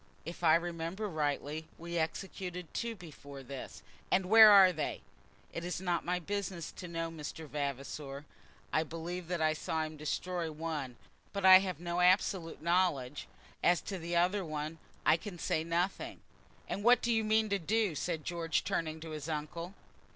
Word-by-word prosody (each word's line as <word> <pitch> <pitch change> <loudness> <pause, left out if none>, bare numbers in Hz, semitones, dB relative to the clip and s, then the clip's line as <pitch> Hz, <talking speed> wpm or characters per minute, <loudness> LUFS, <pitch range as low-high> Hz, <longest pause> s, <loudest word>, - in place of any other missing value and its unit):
"If 170 +2 -7
I 160 -1 +7
remember 170 +4 -2
rightly 155 -1 -2
we 170 0 -3
executed 180 +1 -4
two 230 -1 -2
before 145 -6 -11
this." 135 0 -8 0.3
"And 185 0 +2
where 220 +3 +9
are 195 -3 +8
they?" 155 -3 -3 0.5
"It 170 - -4
is 180 0 -3
not 175 -2 0
my 180 +1 0
business 185 -2 -4
to 180 - -8
know, 165 -1 -3
Mr. 160 0 -7
Vavasor. 140 0 -4 0.5
I 155 - +4
believe 165 +2 -5
that 175 -2 -1
I 155 0 +3
saw 160 +1 -2
him 155 0 -6
destroy 165 +2 -2
one, 150 -5 -4 0.4
but 200 -1 -1
I 185 0 +11
have 185 -5 -3
no 175 0 -2
absolute 180 -3 +2
knowledge. 170 -6 +1 0.4
As 175 0 +5
to 195 -2 -5
the 170 +1 -3
other, 185 +4 +2 0.6
I 160 - +6
can 195 0 -8
say 160 -1 0
nothing." 170 +3 -2 0.5
"And 205 - -3
what 240 +1 +6
do 235 - +2
you 225 -1 +2
mean 220 0 +3
to 200 0 +1
do?" 210 +1 +1
said 160 +1 -3
George, 165 -2 -1
turning 160 -1 -2
to 160 0 -7
his 155 0 -5
uncle. 165 +4 -4
170 Hz, 170 wpm, -33 LUFS, 155-185 Hz, 0.6 s, I